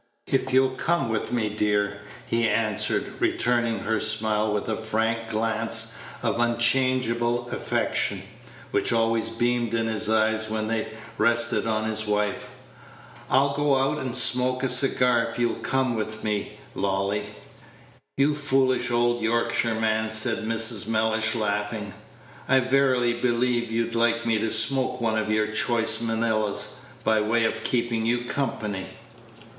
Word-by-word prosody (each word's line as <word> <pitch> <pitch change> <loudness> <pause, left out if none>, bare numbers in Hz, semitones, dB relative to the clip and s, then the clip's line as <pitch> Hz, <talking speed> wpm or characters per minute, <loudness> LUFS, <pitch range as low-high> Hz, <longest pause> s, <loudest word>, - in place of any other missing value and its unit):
"If 130 -1 -1
you'll 130 0 +3
come 165 0 -1
with 110 -1 -2
me, 120 -3 0
dear," 105 -1 0 0.3
he 115 -1 0
answered, 110 -3 0
returning 120 -2 +1
her 110 0 -1
smile 110 -1 +2
with 105 -1 -2
a 110 - -1
frank 115 +1 -2
glance 115 +1 -1 0.3
of 115 -1 -1
unchangeable 120 0 +1
affection, - - -1 0.5
which - - 0
always 115 -1 +1
beamed 120 0 -1
in 115 0 0
his 110 -1 -1
eyes 110 0 +1
when 110 0 -2
they 110 0 -2 0.3
rested 115 +1 +2
on 110 -1 -1
his 110 0 -2
wife. 105 0 -1 0.8
"I'll 140 +2 +3
go 145 -1 +2
out 135 +3 0
and 130 -3 -4
smoke 125 +1 +3
a 135 - +1
cigar 125 -2 +3
if 115 - -7
you'll 120 -1 +1
come 130 -2 0
with 110 0 -5
me, 105 -1 -3 0.2
Lolly." 100 +1 -1 0.9
"You 140 +2 +3
foolish 135 -4 +1
old 120 0 +1
Yorkshireman," 110 -1 0
said 110 0 +2
Mrs. 115 -2 +1
Mellish, 110 0 +1
laughing, 105 -1 -2 0.6
"I 135 0 +5
verily 130 -2 +2
believe 120 0 0
you'd 115 +1 -2
like 115 0 +1
me 115 -2 +1
to 110 +1 -1
smoke 125 +4 +2
one 110 -2 0
of 110 - -3
your 110 0 0
choice 115 +1 +1
Manillas, 110 -2 -1 0.2
by 110 -1 +2
way 115 +2 +1
of 110 0 -2
keeping 115 -2 0
you 120 +1 0
company." 105 -8 -3
115 Hz, 140 wpm, -24 LUFS, 110-120 Hz, 0.9 s, I